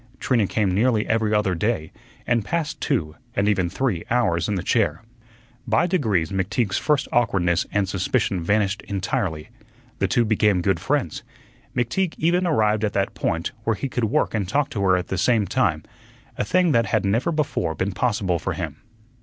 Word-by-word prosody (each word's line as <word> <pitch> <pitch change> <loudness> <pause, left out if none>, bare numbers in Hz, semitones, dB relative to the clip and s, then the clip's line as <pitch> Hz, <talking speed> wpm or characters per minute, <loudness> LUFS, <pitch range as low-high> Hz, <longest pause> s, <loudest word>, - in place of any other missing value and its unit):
Trina 115 -6 +1
came 100 -3 0
nearly 110 +2 +2
every 110 -1 +1
other 105 -3 +2
day, 90 -3 -1 0.3
and 120 -2 +1
passed 160 +7 -3
two, 80 - -1 0.2
and 100 +1 +1
even 95 -4 +2
three, 110 -6 -1
hours 105 -9 +1
in 105 - 0
the 90 - -3
chair. 115 +2 +1 0.6
By - - +3
degrees 110 - 0
McTeague's 95 +2 0
first 150 -3 +1
awkwardness 95 -7 +1
and 100 -2 +1
suspicion 95 0 0
vanished 100 +1 +1
entirely. 95 -4 -2 0.5
The 95 - +2
two 120 +5 +2
became 105 -4 +2
good 95 -3 +1
friends. 130 - -1 0.5
McTeague 130 +9 0
even 175 +3 +2
arrived 110 -8 +2
at 105 - 0
that 100 -1 0
point 85 +1 -2
where 115 -1 +1
he 135 - -3
could 125 -2 -1
work 105 - 0
and 100 -5 -1
talk 145 +5 0
to 105 - -3
her 95 -2 +4
at 90 - -4
the 95 - -1
same 110 +1 +3
time - - 0 0.5
a - - -1
thing 175 - +2
that 115 -5 +2
had - - +1
never 115 +11 +1
before 140 - -1
been 95 +6 -1
possible 95 -4 0
for - - -3
him. - - -5
105 Hz, 180 wpm, -23 LUFS, 95-120 Hz, 0.6 s, her